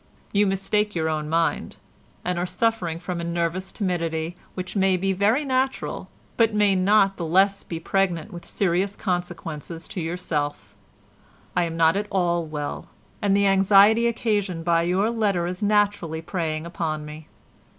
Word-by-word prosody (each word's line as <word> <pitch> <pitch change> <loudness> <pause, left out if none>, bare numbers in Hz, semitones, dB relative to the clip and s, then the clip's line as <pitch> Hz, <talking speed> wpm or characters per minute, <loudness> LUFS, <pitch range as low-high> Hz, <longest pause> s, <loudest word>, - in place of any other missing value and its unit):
You 205 0 +4
mistake 205 +2 0
your 160 -1 0
own 155 -1 -2
mind, 165 +1 0 0.5
and 180 -1 -1
are 175 - 0
suffering 180 -3 0
from 175 0 -4
a - - -4
nervous 170 +2 -2
timidity 170 -4 -2 0.2
which 185 +1 -5
may 190 -2 +3
be 195 +1 0
very 215 +10 +2
natural 265 0 -1 0.3
but 225 -2 +3
may 205 -1 +4
not 195 +1 +3
the 175 - -4
less 195 +4 +3
be 165 - -5
pregnant 180 -2 -1
with 175 - -8
serious 195 +1 0
consequences 175 -3 -4
to 185 - -4
yourself. 160 -3 -3 0.8
I 175 - +2
am 165 0 -5
not 165 +1 +4
at 205 +1 -1
all 175 -3 +1
well, 150 -1 -5 0.3
and 200 -1 +3
the 200 - +3
anxiety 200 +4 +5
occasioned 205 -7 -1
by 170 -1 +3
your 185 +6 +1
letter 205 -7 0
is 180 +1 -4
naturally 205 -6 +1
preying 160 -3 -3
upon 155 -3 -3
me. 150 +1 -10
180 Hz, 160 wpm, -24 LUFS, 165-200 Hz, 0.8 s, anxiety